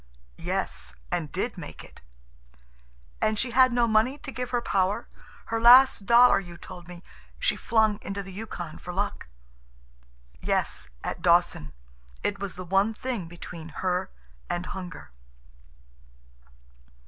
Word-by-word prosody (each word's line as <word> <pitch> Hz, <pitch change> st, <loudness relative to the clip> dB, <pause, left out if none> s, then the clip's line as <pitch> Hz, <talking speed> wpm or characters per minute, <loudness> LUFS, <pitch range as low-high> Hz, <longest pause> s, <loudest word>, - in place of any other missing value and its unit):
"Yes, -, -, -3 dB, 0.2 s
and -, -, -2 dB
did -, -, -3 dB
make -, -, -9 dB
it." -, -, -16 dB, 1.2 s
"And 215 Hz, 0 st, +2 dB
she 240 Hz, +3 st, -1 dB
had 255 Hz, +1 st, +6 dB
no 240 Hz, -1 st, +3 dB
money 225 Hz, +5 st, +3 dB
to 275 Hz, -, -8 dB
give 250 Hz, -1 st, -4 dB
her 245 Hz, -, +1 dB
power. 195 Hz, -3 st, 0 dB, 0.4 s
Her 225 Hz, 0 st, -2 dB
last 245 Hz, -3 st, +7 dB
dollar, 240 Hz, -2 st, +7 dB
you 175 Hz, -3 st, -10 dB
told 175 Hz, -1 st, -10 dB
me, 180 Hz, 0 st, -11 dB, 0.3 s
she -, -, +1 dB
flung 220 Hz, -2 st, +2 dB
into 200 Hz, +1 st, -4 dB
the 190 Hz, 0 st, -10 dB
Yukon 185 Hz, -6 st, -6 dB
for 180 Hz, -, -7 dB
luck." 200 Hz, -, -2 dB, 1.1 s
"Yes, -, -, -1 dB
at -, -, -4 dB
Dawson. 170 Hz, -, +3 dB, 0.5 s
It 200 Hz, -1 st, -1 dB
was 200 Hz, -2 st, -4 dB
the 185 Hz, 0 st, -7 dB
one 195 Hz, +5 st, +2 dB
thing 235 Hz, -8 st, -3 dB
between 170 Hz, -1 st, -9 dB, 0.2 s
her 180 Hz, -1 st, 0 dB, 0.4 s
and 175 Hz, +1 st, -2 dB
hunger." 175 Hz, -, -8 dB
200 Hz, 135 wpm, -27 LUFS, 180-235 Hz, 1.2 s, last